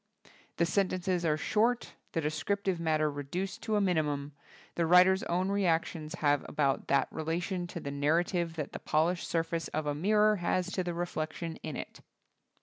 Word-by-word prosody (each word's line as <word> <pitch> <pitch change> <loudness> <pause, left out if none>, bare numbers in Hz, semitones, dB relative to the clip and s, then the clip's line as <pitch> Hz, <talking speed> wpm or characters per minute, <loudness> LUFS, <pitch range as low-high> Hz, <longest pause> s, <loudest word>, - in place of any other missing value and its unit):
The 170 - +3
sentences 185 -1 0
are 155 -1 +2
short, 230 +8 +1 0.2
the 165 - 0
descriptive 185 +5 -1
matter 155 -2 +2
reduced 145 +7 -4
to 220 -1 -1
a 205 - +3
minimum, 150 -6 0 0.4
the 170 -1 0
writer's 185 +2 +6
own 180 +2 0
reactions 170 -4 0
have 145 -4 +2
about 140 -3 0
that 140 -1 +3
relation 175 +3 -2
to 175 - -6
the 140 - -5
narra 145 +4 +2
tive 170 -3 -2
that 150 -3 -4
the - - -6
polished 170 +3 +1
surface 165 0 -1
of 155 0 -3
a 145 - 0
mirror 210 +6 +3
has 180 +1 0
to 185 - -1
the 175 -1 -3
reflection 165 -1 -3
in 155 -3 -6
it. - - -7
170 Hz, 170 wpm, -31 LUFS, 155-185 Hz, 0.4 s, writer's